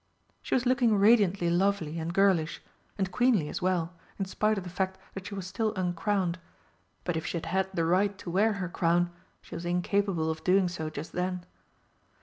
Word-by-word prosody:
She - - -1
was 255 - +1
looking 240 -4 +3
radiantly 200 -4 +4
lovely 175 -3 +1
and 165 +1 -3
girlish 175 -4 +2 0.4
and 190 -2 -1
queenly 220 -8 +2
as - - -4
well, 180 -2 0 0.2
in 195 - -1
spite 215 +3 0
of 195 - -3
the 180 - -7
fact 190 +1 -2 0.2
that 195 0 -7
she 200 - -6
was 195 -2 -5
still 215 +4 -1
uncrowned. 185 0 0 0.6
But 175 - -1
if 160 - -3
she - - -2
had 165 - -5
had 190 0 0
the 170 -3 0
right 195 +4 +2
to 175 - -7
wear 210 +5 +3
her 195 -3 -3
crown, 175 0 +1 0.3
she - - -13
was 170 - -5
incapable 175 -1 0
of 160 0 -7
doing 185 0 +4
so 160 -3 -4
just 155 +1 -7
then. 180 0 -2
185 Hz, 195 wpm, -29 LUFS, 170-200 Hz, 0.6 s, radiantly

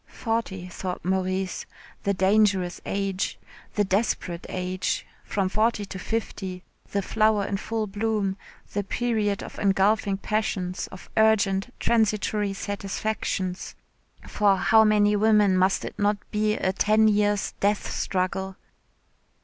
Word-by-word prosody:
Forty, 225 -6 -3
thought 180 0 -5
Maurice, 185 0 -1 0.4
the 200 - +2
dangerous 190 -2 +2
age 195 -1 -1 0.4
the 210 - +3
desperate 190 -3 -1
age. 185 0 -2 0.2
From 195 -2 -1
forty 215 +2 +1
to 190 -1 -7
fifty, 190 -4 -4 0.3
the 200 -1 -1
flower 215 0 +2
in 200 - -1
full 220 +2 -2
bloom, 205 -1 -1 0.4
the 205 - 0
period 210 -2 -1
of - - -9
engulfing 200 +1 +2
passions, 195 -4 -2
of 190 - -12
urgent 220 -1 +3
transitory 215 -2 +1
satisfactions. 195 -2 -3 0.5
For 200 -2 +3
how 220 +4 +5
many 210 -1 +4
women 210 -2 +4
must 185 +1 +2
it - - -8
not 205 0 +2
be 215 0 +1
a 190 - 0
ten 215 +2 +4
years' 205 -1 +2
death 205 +1 +1
struggle. 190 0 -2
200 Hz, 125 wpm, -25 LUFS, 190-215 Hz, 0.5 s, how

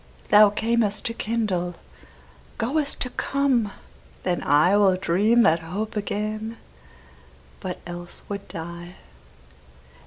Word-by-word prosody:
Thou 210 0 +8
cam'st 220 0 0
to 230 - -1
kindle, 210 -7 -2 0.8
goest 280 +5 0
to 250 - 0
come: 260 -8 +1 0.5
then 180 -1 0
IWill 185 +6 +4
dream 210 +7 +3
that 165 -2 +4
hope 195 +8 -5
again, 215 +2 -3 1.0
but 185 -2 -5
else 175 0 -7
would 200 -1 -6
die. 170 +2 -8
205 Hz, 100 wpm, -24 LUFS, 175-225 Hz, 1.0 s, Thou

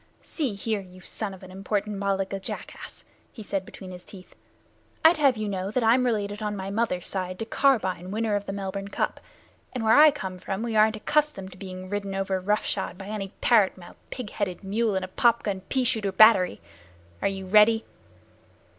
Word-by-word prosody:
"See 275 - -2
here, 215 +1 -2
you 185 -1 -14
son 210 +2 -4
of 190 0 -12
an 185 - -11
imported 200 +2 -2
Malaga 195 -1 -1
jackass," 195 - -8 0.3
he 220 - -10
said 195 -2 -3
between 185 -1 -10
his 180 0 -10
teeth, 185 -2 -13 0.7
"I'd 330 +1 +7
have 275 -5 +3
you 215 -1 -2
know 190 -1 -3
that 240 +3 0
I'm 245 +3 +4
related 205 -2 -1
on 210 -1 -2
my 195 0 -5
mother's 200 -5 -1
side 185 -1 -3
to 225 - -4
Carbine, 195 -9 +1
winner 215 +1 -1
of 205 0 -3
the - - -2
Melbourne 195 0 -4
Cup, 200 - -2 0.5
and 250 -3 -3
where 220 0 +4
I 305 0 +9
come 190 -10 -5
from 195 +4 -4
we 230 -2 -2
aren't 215 +1 +5
accustomed 215 -5 0
to 180 - -13
being 185 -1 -7
ridden 200 0 -3
over 195 -1 -1
roughshod 195 -1 -1
by 195 +1 -8
any 210 -2 -3
parrot 215 -6 +4
mouthed, 175 -1 -14
pig 250 -5 -6
headed 200 -2 -3
mule 210 +2 0
in 190 - -1
a - - -4
pop 235 +5 +2
gun 195 -3 -2
pea 260 -1 +1
shooter 215 -5 +1
battery. 190 - +5 0.6
Are - - +2
you 195 -1 -4
ready?" 215 +3 +5
200 Hz, 200 wpm, -26 LUFS, 190-220 Hz, 0.7 s, I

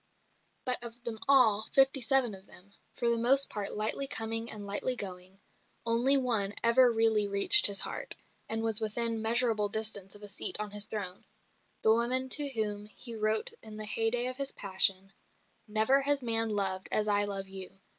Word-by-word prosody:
But 250 -1 +1
of 235 0 -9
them 225 -2 -6
all, 225 -6 +3
fifty 270 0 +3
seven 245 -1 +2
of 190 0 -14
them 200 +3 -17 0.2
for 240 - -4
the 235 0 +1
most 270 +4 +2
part 205 -1 -3
lightly 220 +6 -1
coming 225 -2 -1
and 210 -1 -8
lightly 205 +6 -3
going 185 -2 -9 0.5
only 240 +4 +3
one 220 -6 -1
ever 240 +1 +4
really 225 -2 +1
reached 200 +12 +8
his 200 -1 +1
heart, - - -5 0.3
and 225 0 -2
was 225 -1 -1
within 225 +1 -1
measurable 225 -2 +1
distance 205 -2 -1
of 205 - -12
a - - -4
seat 205 - -2
on 210 -1 -6
his 205 0 -2
throne 195 -4 -7 0.6
the 220 - +4
woman 250 +3 -1
to 290 +1 +2
whom 210 -4 -4
he 235 +3 -9
wrote 215 0 -1
in 215 -1 -8
the 215 - -4
hey 225 +1 0
day 245 +1 0
of 255 0 -4
his 275 -1 -4
passion, 195 0 +1 0.5
"Never 220 +6 +2
has 280 -1 -1
man 225 -1 +1
loved 195 -3 -1
as 210 0 0
I 205 0 +1
love 195 -1 -5
you. 190 0 -11
220 Hz, 185 wpm, -29 LUFS, 205-240 Hz, 0.6 s, reached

